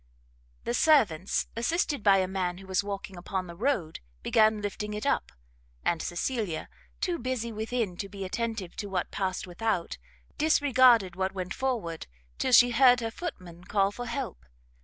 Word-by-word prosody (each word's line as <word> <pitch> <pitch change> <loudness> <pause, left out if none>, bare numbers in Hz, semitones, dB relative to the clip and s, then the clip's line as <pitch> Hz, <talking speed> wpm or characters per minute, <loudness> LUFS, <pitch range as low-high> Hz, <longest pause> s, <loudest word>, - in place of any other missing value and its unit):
The 235 - -2
servants, 220 - +3
assisted 290 +3 0
by 200 -1 +5
a 185 -1 +1
man 185 -2 -2
who 195 - -11
was 190 +1 0
walking 195 -2 -6
upon 185 +1 -3
the 170 -1 -9
road, 200 - -1 0.2
began 220 -1 +4
lifting 210 +1 -4
it 210 - -4
up; 280 - 0 0.5
and 170 - +1
Cecilia, 185 -2 -2 0.3
too 350 -2 0
busy 240 -2 -2
within 220 -3 -2
to 200 - -5
be 195 -1 -6
attentive 220 -2 -3
to 205 - -4
what 190 - -2
passed 190 -2 -2
without, 180 - -2 0.4
disregarded 255 - +5
what 190 +1 -1
went 185 -1 -4
forward, 230 -12 -2 0.3
till - - 0
she 245 0 +7
heard 250 +1 +6
her 225 -1 -2
footman 180 - -7
call 200 0 +2
for 245 +3 -6
help. 240 - -4
210 Hz, 160 wpm, -28 LUFS, 185-245 Hz, 0.5 s, she